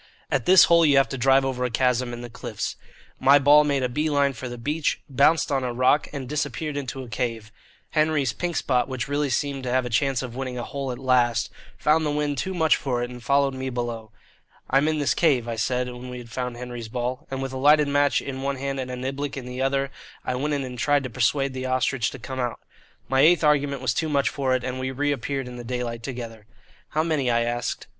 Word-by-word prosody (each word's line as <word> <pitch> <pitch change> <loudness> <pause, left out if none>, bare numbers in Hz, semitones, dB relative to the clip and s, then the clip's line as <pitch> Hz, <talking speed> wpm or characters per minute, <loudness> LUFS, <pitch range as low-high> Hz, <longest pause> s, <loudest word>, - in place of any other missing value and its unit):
At 130 -4 0
this 185 -1 +8
hole 170 0 +5
you 145 -3 +5
have 135 - +4
to - - -4
drive 135 +2 +4
over 130 -1 -2
a 125 - 0
chasm 125 0 +1
in 120 0 -6
the 120 - -6
cliffs. - - -5 0.4
My 140 +2 +6
ball 145 +2 +6
made 140 -3 0
a - - +2
bee 150 +5 -1
line 140 -2 +2
for 130 +1 -6
the 120 - -7
beach, 150 +6 -1
bounced 145 +4 +3
on 135 -2 +1
a 125 - -1
rock, 130 +4 +2
and 140 -3 -5
disappeared 150 +1 -3
into 135 -1 -4
a - - -10
cave. 115 -1 -3 0.4
Henry's 155 -5 +1
"Pink 175 -2 -3
Spot," 125 -3 +1
which 130 -3 -4
really 145 0 0
seemed 140 +2 -1
to 130 - -4
have 130 0 +1
a 125 - -5
chance 135 +3 +1
of 120 -2 -7
winning 130 -1 -4
a 120 - -3
hole 140 0 -4
at 125 - -5
last, 120 -3 +2 0.3
found 155 +1 +2
the 150 - 0
wind 145 -1 -1
too 190 0 -3
much 160 -2 +3
for 125 -3 -2
it 120 - -5
and 125 0 -9
followed 140 +2 +2
me 130 0 -4
below. 120 -3 -4 0.6
"I'm 135 +3 +4
in 155 0 +1
this 145 -2 +1
cave," 135 -8 +2
I 115 - -2
said, 125 +2 0
when 125 0 -8
we 125 - -6
had 120 -2 -10
found 125 0 -4
Henry's 120 -2 -7
ball; 125 +2 -3
and 135 0 -4
with 135 0 -4
a - - -3
lighted 150 +2 +5
match 145 0 +2
in 135 -1 -5
one 140 0 -1
hand 135 0 -3
and 130 -1 -4
a 125 - -4
niblick 135 +3 -4
in 130 - -6
the 125 +1 -5
other 135 +1 0 0.3
I - - -1
went 145 +4 -1
in 140 - -2
and 125 -2 -7
tried 145 0 +2
to 130 - -5
persuade 135 +3 +1
the 130 0 -4
"Ostrich" 130 -2 +1
to - - -9
come 130 +2 -6
out. 120 -2 -2 0.5
My 130 +1 +1
eighth 165 +2 +5
argument 145 -2 +2
was 125 -3 +1
too 160 +6 -1
much 140 -2 +2
for 130 -2 0
it, 130 - -2
and 130 +1 -4
we 130 0 -2
reappeared 140 -1 -2
in 125 0 -8
the 120 - -7
daylight 120 -1 -4
together. 115 -3 -7 0.4
"How 155 +1 0
many?" 155 -6 0
I 115 0 +2
asked. 120 0 -3
130 Hz, 245 wpm, -24 LUFS, 125-145 Hz, 0.6 s, this